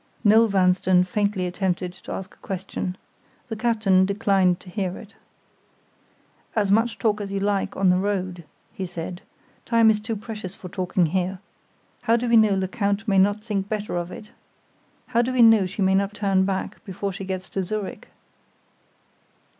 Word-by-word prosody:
Noel 220 +2 +6
Vanstone 185 -2 +3
faintly 200 0 -1
attempted 180 -1 -2
to - - -11
ask 190 0 -6
a - - -23
question. 190 -1 -5 0.5
The 225 - -3
captain 215 -5 +3
declined 195 -3 +2
to 185 - -12
hear 185 -2 -2
it. 220 - -12 1.4
"As 205 -3 +1
much 225 +3 +2
talk 210 -2 0
as 200 -1 -5
you 200 - -1
like 200 0 -1
on 195 -1 +3
the 180 - +2
road," 185 -3 -2 0.3
he 190 - -5
said. 175 +1 -6 0.4
"Time 230 -1 +4
is 210 - 0
too 225 +1 -4
precious 210 -3 -7
for 180 - -10
talking 185 -1 0
here. 185 +3 -1 0.6
How 230 -1 +3
do 245 +1 -2
we 235 - +4
know 215 -3 +5
Lecount 200 +2 -1
may 195 -2 +4
not 205 +2 +3
think 205 -3 -3
better 210 -3 -3
of 175 +1 -3
it? 215 +1 -10 0.7
How 235 - +1
do 245 +2 -1
we 250 -2 +5
know 225 -4 +6
she 200 +2 -3
may 190 0 +3
not 200 +1 +1
turn 195 -2 +2
back 190 -1 -3
before 195 -1 -4
she 195 - -6
gets 190 0 -4
to 195 - -1
Zurich?" 205 +2 -5
195 Hz, 175 wpm, -24 LUFS, 185-215 Hz, 1.4 s, Noel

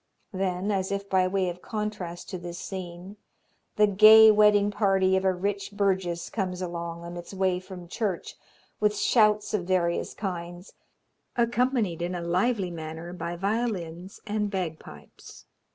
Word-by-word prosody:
Then, 190 +1 -1
as 190 -1 -1
if 200 0 -3
by 185 -1 +2
way 190 0 0
of 175 0 -5
contrast 210 -6 -5
to 185 - -4
this 175 0 -7
scene, 185 +1 -7 0.6
the 210 - +5
gay 215 +2 +8
wedding 210 -1 +4
party 195 -2 +2
of 190 - +1
a 190 - +3
rich 200 +2 -3
burgess 190 -4 0
comes 185 -4 -2
along 170 -1 -5
on 170 +1 -7
its 175 +3 -9
way 185 -1 +1
from 185 -1 -10
church, 195 -1 -3 0.4
with 210 0 +1
shouts 210 -2 +3
of 190 -5 0
various 175 -2 0
kinds, 175 -2 -6 0.6
accompanied 235 -6 +1
in 175 +1 -2
a 175 - -4
lively 185 +2 0
manner 160 +1 -7
by 170 -1 -4
violins 195 -3 -3
and 210 -1 -1
bagpipes. 180 -5 -7
190 Hz, 150 wpm, -27 LUFS, 175-210 Hz, 0.6 s, gay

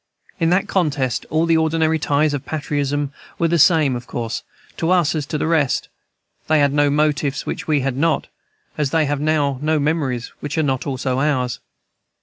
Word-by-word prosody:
In 165 -1 +2
that 185 +2 +2
contest 145 -9 0
all 160 +1 +2
the 165 -1 +3
ordinary 160 0 +1
ties 145 +1 +1
of 145 -2 -3
patriotism 145 -2 -2 0.2
were 170 - +2
the 170 0 +2
same, 155 -4 +4
of 120 0 -7
course, 115 -2 -4 0.4
to 165 - -1
us 175 -4 +3
as 150 -3 -3
to 155 - -2
the - - -1
rest; 155 -5 +1 0.6
they 155 - +3
had 145 -1 +3
no 145 0 +3
motives 150 -1 0
which - - -5
we 150 -3 +2
had 135 -1 -1
not, 160 +4 +1 0.5
as 145 -3 +1
they 160 +1 +2
have 145 0 -1
now 145 -3 +1
no 155 +1 +1
memories 140 -5 -1
which 145 +2 -5
are 160 - +2
not 135 -2 -1
also 130 -1 -1
ours. 130 -4 0
145 Hz, 190 wpm, -20 LUFS, 140-160 Hz, 0.6 s, same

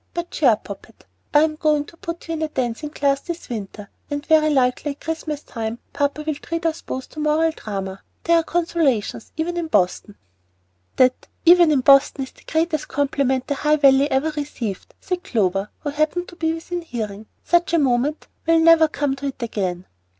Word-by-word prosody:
But 345 0 -4
cheer - - +3
up, - - +1
Poppet; - - -11 0.3
I'm 305 +1 +3
going 300 -2 +1
to 335 - -15
put 335 0 -7
you 330 - -3
into 315 -1 -1
a - - -21
dancing 255 +1 -3
class 280 -2 0
this 340 -1 -7
winter, 205 -3 -6 0.2
and 290 0 -4
very 310 -1 +4
likely 265 +1 +1
at 280 - -27
Christmas 315 -2 -4
time 225 0 -5 0.2
papa 285 +1 -1
will 310 - 0
treat 335 +3 -5
us 325 0 0
both 260 - -5
to 310 - -10
a - - -2
Moral 310 +2 +2
Drayma. 195 -8 -6 0.2
There 335 0 +4
are 330 - +2
consolations, 320 -11 0
even 345 +2 -2
in 340 -2 -2
Boston." 200 - 0 0.8
"That 255 0 +2 0.2
'even 345 -1 +7
in 280 -3 +3
Boston' 275 +1 +5
is 265 - -9
the - - -22
greatest 320 -1 0
compliment 270 -2 0
the 285 - -1
High 300 +2 +2
Valley 280 -1 +5
ever 295 +3 +1
received," 280 -9 -5
said 365 -1 -3
Clover, 195 -2 0
who 290 - -3
happened 310 +4 -1
to 350 - -13
be 320 -2 0
within 335 +2 -4
hearing. 220 -8 -6 0.2
"Such 345 0 +2
a - - +5
moment 275 +1 +1 0.2
will 330 0 +5
never 325 0 +6
come 290 -3 -1
to 280 +1 -4
it 265 -2 -5
again." 185 -5 -3
295 Hz, 195 wpm, -22 LUFS, 255-325 Hz, 0.8 s, even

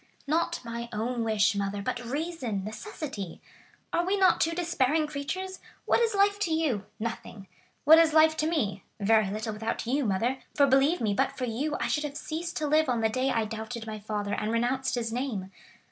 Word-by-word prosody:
"Not 320 +4 0
my 235 0 -5
own 230 +2 -2
wish, 220 -1 +3
mother, 200 0 -2
but 245 +4 -3
reason—necessity. 245 - -4 0.5
Are 340 - +2
we 385 +3 +1
not 375 -3 +4
two 330 - +2
despairing 320 -3 +1
creatures? 355 +6 -4 0.3
What - - +3
is 460 -2 +2
life 405 +1 +3
to 360 -5 0
you?—Nothing. 220 -8 -3 0.4
What 320 +3 +8
is 330 -1 +5
life 315 0 +5
to 310 - +1
me?—Very 215 - +1
little 215 +2 -3
without 225 +2 -3
you, 275 +5 +1
mother; 230 +6 0 0.2
for 285 - +6
believe 275 +5 +3
me, 210 -3 +1
but 275 +7 0
for 255 - -1
you 265 +6 -2
I - - 0
should 300 - 0
have 290 0 -5
ceased 330 +3 -4
to 310 - -1
live 305 0 +3
on 240 -2 +1
the 220 - +3
day 255 +4 0
I 225 -3 +1
doubted 225 +2 -6
my 215 -1 -5
father 205 -1 -3
and 215 - -1
renounced 255 +3 0
his 230 -2 -2
name. 230 -7 -3
250 Hz, 190 wpm, -28 LUFS, 220-310 Hz, 0.5 s, What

